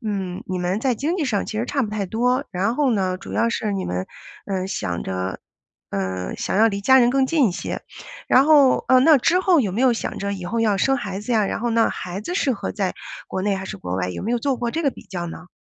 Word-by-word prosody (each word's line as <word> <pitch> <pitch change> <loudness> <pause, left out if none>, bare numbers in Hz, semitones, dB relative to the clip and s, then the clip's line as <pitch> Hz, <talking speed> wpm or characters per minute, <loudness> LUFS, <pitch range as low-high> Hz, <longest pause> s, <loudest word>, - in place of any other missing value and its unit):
嗯， 190 -3 -3
你 185 -1 -3
们 180 +4 -1
在 260 -1 +1
经 305 - -1
济 320 - 0
上 215 -6 0
其 215 - -4
实 235 - 0
差 275 -1 0
不 210 - -3
太 210 -2 -2
多。 250 +6 +1
然 200 +5 0
后 285 -2 +2
呢， 185 -3 0
主 - - -9
要 230 - +2
是 215 -2 -2
你 195 -1 -2
们， 90 +1 -3 0.4
呃 190 -2 -2
想 90 - -3
着 95 0 -3 0.5
呃 95 -2 -3
想 - - -2
要 220 +2 +6
离 200 -1 -3
家 265 +5 +6
人 240 -1 +5
更 265 0 +2
近 290 -4 +3
一 - - -3
些。 185 - -4 0.5
然 260 - +5
后， 290 -3 +5
呃， 260 0 +7
那 300 +3 +7
之 345 +8 +3
后 360 -5 +4
有 205 -6 0
没 225 - -2
有 260 -2 +5
想 230 - -4
着 200 0 -2
以 190 -2 -6
后 230 +6 -1
要 210 -3 +2
生 270 +7 +2
孩 200 -5 -4
子 240 +3 -3
呀？ 215 -3 +3
然 - - -3
后 240 0 -1
那 230 0 +3
孩 185 +2 -5
子 355 +12 -5
适 275 -8 +1
合 210 - -4
在 195 -3 -2 0.3
国 190 - -3
内 205 -1 +1
还 190 0 -5
是 - - -6
国 90 +1 -4
外， 90 -1 -1
有 90 - -5
没 230 +4 -1
有 245 - +1
做 265 +2 0
过 235 -1 -2
这 330 +5 -2
个 280 - +2
比 - - -13
较 175 -2 -5
呢？ 175 +2 -9
215 Hz, 290 characters per minute, -22 LUFS, 185-255 Hz, 0.5 s, 呃